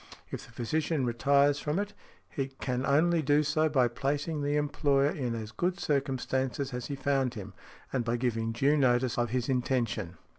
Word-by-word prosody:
If - - -5
the - - -17
physician 140 +4 -1
retires 140 +4 +3
from 150 +3 -2
it, 205 +1 -2 0.3
he 135 -4 -3
can 130 -1 -3
only 160 +4 +3
do 145 +1 +3
so 155 +1 +2
by 130 -5 +3
placing 145 +5 -2
the 145 +1 0
employer 145 -1 +2
in 125 -5 -2
as 110 -1 -6
good 175 - -1
circumstances 135 -2 -1
as 125 -1 -4
he 140 - -3
found 135 -2 0
him, 105 -3 -7 0.4
and 130 -3 +1
by 115 +1 0
giving 115 -2 -1
due 135 +6 +2
notice 125 -3 +2
of 120 -1 +1
his 125 +1 -1
intention. 120 -8 -1
135 Hz, 180 wpm, -30 LUFS, 120-145 Hz, 0.4 s, retires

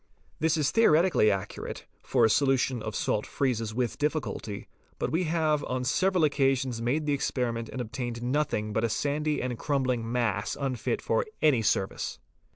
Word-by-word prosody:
This 160 +1 +2
is 150 -3 +1
theoretically 175 - +4
accurate, 100 0 -4 0.2
for - - +3
a - - +4
solution 130 -3 +2
of 110 -1 -5
salt 105 - 0
freezes 115 -5 -1
with 120 +1 -2
difficulty, 145 -8 -2 0.3
but - - -2
we 170 +4 +1
have 155 -2 +1
on 125 0 -2
several 185 +6 +2
occa 135 -2 +3
sions 125 -3 -3
made 140 +6 0
the 145 - +1
experiment 120 -4 -1
and 130 - -6
obtained 120 0 -4
nothing 125 -5 0
but 110 - 0
a 115 - +2
sandy 150 +5 -1
and 125 -2 -3
crumbling 130 -5 0
mass 120 -1 -1
unfit 135 -3 -2
for - - +1 0.2
any 140 -7 +5
service. 95 -2 -1
130 Hz, 165 wpm, -28 LUFS, 115-150 Hz, 0.3 s, any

